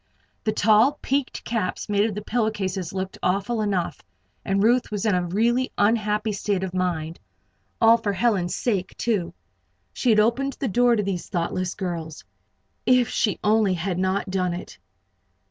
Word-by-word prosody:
The 215 - +2
tall, 220 +7 +4
peaked 275 0 -1
caps 220 -6 -2
made 205 0 +2
of 205 - -6
the 210 - -5
pillow 220 0 0
cases 190 -4 -3
looked 190 0 -5
awful 200 +5 0
enough, 195 -5 -1 0.4
and 195 +1 +1
Ruth 240 +3 +3
was 210 0 -3
in 215 - +3
a 180 -1 0
really 235 +7 +1
unhappy 210 0 +1
state 200 -1 -1
of 185 -2 -4
mind. 170 -3 -2 0.6
All 225 0 +6
for 215 -3 -2
Helen's 195 -5 +1
sake, 200 -7 -2
too. 180 -7 -1 0.6
She 250 - 0
had 215 -2 +5
opened 245 +6 +2
the 270 - -3
door 245 +3 +3
to 210 - 0
these 190 -3 -3
thoughtless 180 +1 -2
girls. 170 -5 -5 0.6
If 250 -2 +3
she 210 - 0
only 210 -3 +3
had 180 +1 -2
not 190 +1 -1
done 180 -2 0
it! 180 - -9
205 Hz, 165 wpm, -24 LUFS, 185-225 Hz, 0.6 s, All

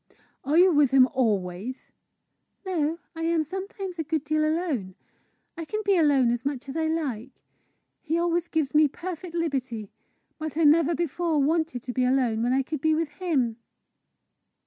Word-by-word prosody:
"Are 290 +4 +1
you 365 +1 +7
with 290 -3 +4
him 260 -1 +6
always?" 215 -1 -2 0.7
"No; 330 -4 -1 0.2
I 325 - -6
am 330 -1 +1
sometimes 380 +1 -6
a - - 0
good 315 -1 -2
deal 310 +1 0
alone. 310 - -1 0.6
I 335 - -5
can 425 +7 -3
be 400 -1 +4
alone 285 -7 +4
as 240 0 -2
much 280 -1 -3
as 270 - -7
I 320 -1 0
like; 270 -7 -4 0.6
he 325 0 -1
always 345 0 0
gives 310 -5 -1
me 305 0 +6
perfect 345 +2 -7
liberty. 260 - -2 0.5
But 310 -1 -5
I 330 - +2
never 320 +2 +5
before 340 0 -1
wanted 300 -3 0
to 250 - -5
be 255 - +1
alone 250 -3 +1
when 240 +1 +1
I 265 +1 +2
could 305 +1 -5
be 315 +1 +3
with 320 -1 -1
him." 265 -11 0
310 Hz, 170 wpm, -26 LUFS, 260-335 Hz, 0.7 s, you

